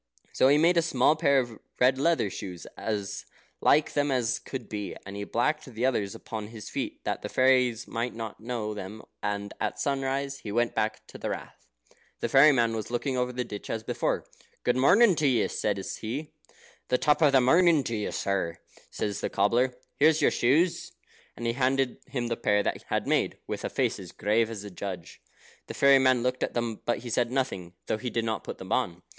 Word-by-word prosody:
So - - +4
he 145 +2 +5
made 170 +3 +4
a - - +6
small 150 -2 +3
pair 140 -3 +3
of 120 -4 -1 0.2
red 130 +1 +4
leather 160 - +2
shoes, 90 -3 -7
as 100 - -4 0.3
like 150 +1 +4
them 145 0 +1
as 125 -5 +1
could 130 -4 -7
be, 105 -2 -5
and 100 +1 -8
he 100 0 -4
blacked 135 +9 0
the 125 -2 -3
others 105 -7 0
upon 110 -2 -6
his 110 -2 -9
feet, - - -4
that - - -2
the - - -5
fairies 125 -2 +3
might 120 +1 -3
not 115 -2 -6
know 115 -2 -3
them, 105 +1 -8 0.2
and 100 0 -3
at - - -2
sunrise 140 0 -1
he 105 - -7
went 120 +2 0
to 110 0 -3
the - - -3
Rath. - - -7 0.5
The - - -2
fairy 140 +3 +7
man 115 -4 +2
was 110 -2 -4
looking 125 +3 -1
over 125 0 0
the 125 0 -2
ditch 105 -4 -8
as 115 -1 -3
before. - - -1 0.4
"Good 125 - +2
morning 185 - +6
to 150 - +2
you," 120 -5 +3
said 105 -2 -1
he. 115 +9 -5 0.5
"The 125 - +2
top 150 +3 +2
of 150 -3 +6
the 135 - +6
morning 165 +3 +5
to 115 - -3
you, 105 -1 -2
sir," 95 -4 -1 0.3
said 105 - -2
the - - -3
cobbler; 120 +6 +2 0.2
"here's 155 +2 +5
your - - +4
shoes." 165 +8 +1 0.4
And 120 - -5
he 115 - +1
handed 130 0 +1
him 130 -3 -3
the 120 0 -1
pair 105 -1 +2
that - - -1
he - - -19
had - - -1
made, - - +1
with - - -5
a - - -2
face - - 0
as - - -10
grave 110 +2 +1
as 105 -3 -6
a 105 - -8
judge. 90 -2 -7 0.5
The - - -7
fairy 140 -1 +6
man 130 -2 +3
looked 125 0 -1
at - - -2
them, 115 -2 -2
but 120 - -1
he 120 - -5
said 120 +1 +1
nothing, 95 -10 -2
though 110 - -1
he 125 - -3
did 115 -1 -1
not 110 -2 -2
put - - -6
them 95 +2 -10
on. 90 -9 -1
120 Hz, 215 wpm, -28 LUFS, 105-135 Hz, 0.5 s, fairy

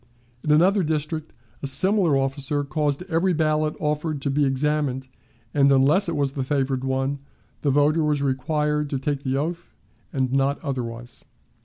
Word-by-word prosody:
In 150 - 0
another 185 +6 +4
district 155 -1 -2 0.3
a 140 - -2
similar 175 +2 +4
officer 135 +1 -1
caused 145 +2 -1
every 180 +1 +1
ballot 155 -1 +1
offered 150 0 -1
to 140 - 0
be 145 0 +2
examined, 135 -1 0 0.5
and, 140 -1 +4
unless 145 +8 +4
it 165 - -2
was 140 -2 0
the 135 - -4
favored 135 -1 -1
one, 135 +1 -1 0.4
the 145 - +1
voter 145 +3 +3
was 150 -1 +1
required 150 +2 0
to 140 - -1
take 140 +1 -2
the 135 -1 -1
oath, 170 +4 -4 0.4
and 130 -2 -1
not 135 +1 +1
otherwise. 120 -4 -5
145 Hz, 160 wpm, -24 LUFS, 135-155 Hz, 0.5 s, another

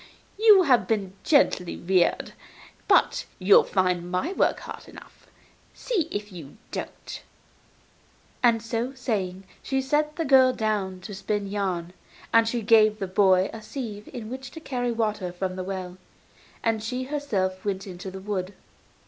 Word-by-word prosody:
You 425 -4 +7
have 260 -7 +3
been 200 -4 -1
gently 190 - +2
reared, 185 0 +1 0.5
but - - +3
you'll 195 +2 +6
find 180 -2 0
my 185 - -1
work - - +1
hard - - -9
enough. - - -15 0.5
See 390 -11 -1
if 205 0 -5
you 165 -1 -11
don't.' - - -7 1.2
And, 230 -2 +3
so 235 +3 -3
saying, 195 -7 -3 0.2
she 270 0 -1
set 300 +3 0
the 330 - -2
girl 260 -2 +6
down 205 -5 -2
to 205 - -8
spin 205 +1 -2
yarn, 185 -4 -3 0.4
and 230 0 +5
she 235 0 -2
gave 215 -1 +5
the 200 - -3
boy 190 0 +3
a 225 - -8
sieve 215 -3 -7
in 235 -3 -7
which 265 0 -6
to 320 - -8
carry 245 -5 -2
water 215 -5 -1
from 185 +1 -4
the 185 - -4
well, 185 -1 -5 0.7
and 225 -1 +1
she 250 +4 -3
herself 210 -10 -2
went 195 -2 -2
out 195 - -8
into 180 +2 -7
the 190 +1 -8
wood. 195 -1 -4
210 Hz, 155 wpm, -25 LUFS, 185-250 Hz, 1.2 s, You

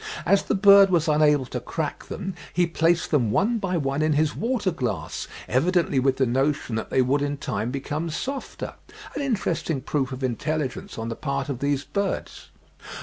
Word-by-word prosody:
As 200 0 +4
the - - -1
bird 200 0 +7
was 170 -3 +2
unable 150 -3 +4
to 125 - -4
crack 150 +5 -4
them, 190 -1 -5 0.2
he 175 0 +3
placed 165 +1 +1
them 130 -8 +3
one 220 - +2
by 185 -3 -1
one 140 -1 -1
in 155 0 +2
his 150 0 +1
water 230 -5 0
glass, 110 - -3 0.2
evidently 165 +1 +2
with 130 0 +2
the 130 - +3
notion 135 +1 0
that 110 - -3
they 130 - +3
would 140 +3 +1
in 145 0 -1
time 120 -3 -2
become 145 +5 -3
softer—an 270 - -6
interesting 190 - -1
proof 135 0 -1
of 130 +1 -6
intelligence 135 +2 -2
on 115 0 -4
the 115 - -3
part 140 0 -3
of 130 -4 -3
these 140 0 0
birds.") 200 +4 -3
150 Hz, 180 wpm, -25 LUFS, 135-180 Hz, 0.2 s, bird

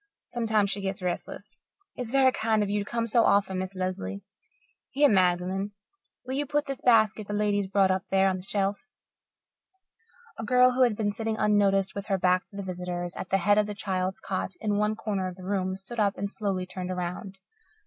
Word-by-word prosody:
Sometimes 220 -4 +1
she 200 - -3
gets 195 -1 -4
restless. 180 -1 -5 0.4
It's 250 -3 -5
very 265 +1 +4
kind 220 -3 +1
of 200 - -2
you 205 0 0
to - - -12
come 230 -1 -1
so 230 +1 +3
often, 195 -2 +2
Miss 185 +1 -5
Lesley. 185 +2 -4 0.7
Here, 290 +2 +4
Magdalen, 185 -1 +1 0.5
will 260 - -4
you 285 +1 -1
put 295 +1 0
this 275 -2 -5
basket 220 -3 +3
the 205 - -4
lady's 205 -1 +1
brought 195 -1 +3
up 185 +1 -1
there 195 0 +3
on 190 -1 0
the - - -8
shelf?" 195 +1 -1 1.6
A - - -3
girl, 250 +2 +5
who 255 +1 0
had 240 -4 +4
been 205 -1 0
sitting 220 +1 -3
unnoticed 200 -2 +2
with 200 0 -6
her 195 -2 +1
back 180 0 +2
to - - -17
the 200 - -4
visitors, 180 -1 -4
at 185 - -6
the 195 - +3
head 205 +3 +3
of 210 - +1
the 210 - -5
child's 190 -2 -2
cot 190 0 -3
in 210 -2 0
one 210 +1 +1
corner 200 -4 -2
of 185 - -6
the 185 - -12
room, 190 -1 -1
stood 210 +5 -8
up 200 -2 +2
and 200 +1 -3
slowly 195 -4 -2
turned 180 0 -6
around. 180 +2 -4
200 Hz, 210 wpm, -27 LUFS, 185-215 Hz, 1.6 s, girl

